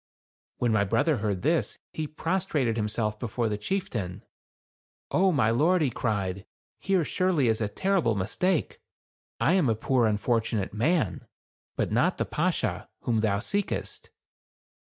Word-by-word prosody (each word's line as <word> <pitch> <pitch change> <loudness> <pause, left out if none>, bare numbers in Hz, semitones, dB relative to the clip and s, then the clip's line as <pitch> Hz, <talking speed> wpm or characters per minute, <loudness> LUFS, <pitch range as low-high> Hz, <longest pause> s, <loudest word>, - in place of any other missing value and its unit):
When 120 -2 +1
my 105 -2 +3
brother 145 +9 +2
heard 100 -3 -2
this, 160 +4 +1 0.2
he 155 -1 -3
prostrated 155 - -1
him 105 -2 0
self 105 -1 -1
before 115 0 -1
the 105 - -1
chieftain. 105 - -3 0.4
" - - -76
O, 190 +1 +4
my 125 -9 +2
lord," 160 +8 +3
he 135 - +1
cried, 100 -5 -2 0.3
"here, 190 -3 +1
surely, 180 -8 +1
is 110 0 +1
a 105 - +1
terrible 180 - +1
mistake. 155 - -1 0.6
I 165 - +3
am 180 -9 +3
a 110 - +2
poor 120 +1 +2
unfortunate 110 -1 0
man; 115 - 0 0.5
but - - -1
not - - +2
the - - 0
Bashaw, - - -1
whom 115 -2 +1
thou 105 -2 +1
seekest." 200 - -2
120 Hz, 150 wpm, -27 LUFS, 105-165 Hz, 0.6 s, O